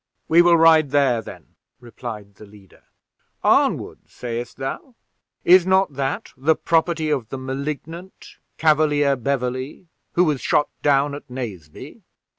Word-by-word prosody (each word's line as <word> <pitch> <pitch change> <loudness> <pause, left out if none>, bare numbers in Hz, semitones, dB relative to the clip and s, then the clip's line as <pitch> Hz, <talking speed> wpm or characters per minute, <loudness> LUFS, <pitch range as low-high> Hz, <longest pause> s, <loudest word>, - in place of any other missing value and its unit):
"We 170 +2 +6
will 175 -1 +5
ride 160 -2 +5
there, 135 -4 +2
then," - - -12 0.3
replied 115 -4 -9
the 105 +2 -15
leader. 100 -2 -20 0.6
"Arnwood, - - +1
sayest 120 0 -6
thou? 135 - -6 0.5
is 185 0 +6
not 190 -4 +2
that 135 0 -4
the 145 +4 +2
property 160 -1 0
of 130 -7 -2
the 135 - -5
Malignant 145 +7 -7 0.2
Cavalier 150 -3 +2
Beverley, 130 +5 -4 0.2
who 180 - +3
was 150 -6 0
shot 150 - +1
down 145 0 +2
at 145 -1 -9
Naseby?" 105 - -8
140 Hz, 130 wpm, -21 LUFS, 125-160 Hz, 0.6 s, We